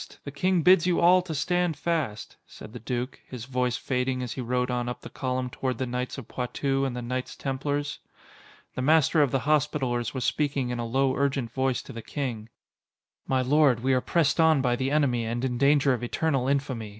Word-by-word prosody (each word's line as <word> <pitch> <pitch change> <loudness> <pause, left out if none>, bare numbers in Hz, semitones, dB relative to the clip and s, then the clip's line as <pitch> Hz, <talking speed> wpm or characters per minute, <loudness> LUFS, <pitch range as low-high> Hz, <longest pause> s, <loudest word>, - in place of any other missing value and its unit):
The 140 - -7
King 180 +4 +1
bids 180 0 +5
you 180 - +2
all 180 +2 +6
to 170 -3 -6
stand 175 +2 0
fast," 150 -9 -2
said 105 +1 -12
the 125 - -7
duke, 125 +2 -4
his 125 -3 -7
voice 125 -1 -1
fading 125 0 -1
as 125 - -5
he 130 - -5
rode 125 +1 -1
on 120 0 -1
up 125 - -6
the - - -10
column 130 -1 -2
toward 130 -2 -3
the 130 - -2
knights 125 +2 -4
of 135 - -8
Poitou 135 +2 -1
and 130 -2 -3
the 125 - -5
Knights 125 +1 -4
Templars. 145 +2 -3 0.7
The - - -4
Master 155 +2 +4
of 145 - +3
the 135 0 0
Hospitallers 140 -5 0
was 130 -3 -3
speaking 140 -4 0
in 120 - -3
a 120 - -3
low, 130 +2 +1
urgent 135 -4 -1
voice 130 -1 -1
to - - -10
the 115 - -7
King: 120 -5 -5 0.8
"My 130 -1 +1
lord, 135 -3 +3
we 135 0 +2
are 130 - +2
pressed 165 +1 +1
on 160 -2 +5
by 125 -2 +1
the 130 +2 -1
enemy 140 -5 +1
and 120 +3 -2
in 125 -2 -2
danger 140 0 +4
of 125 - -3
eternal 135 +1 0
infamy. 135 -5 -1
130 Hz, 210 wpm, -26 LUFS, 125-145 Hz, 0.8 s, all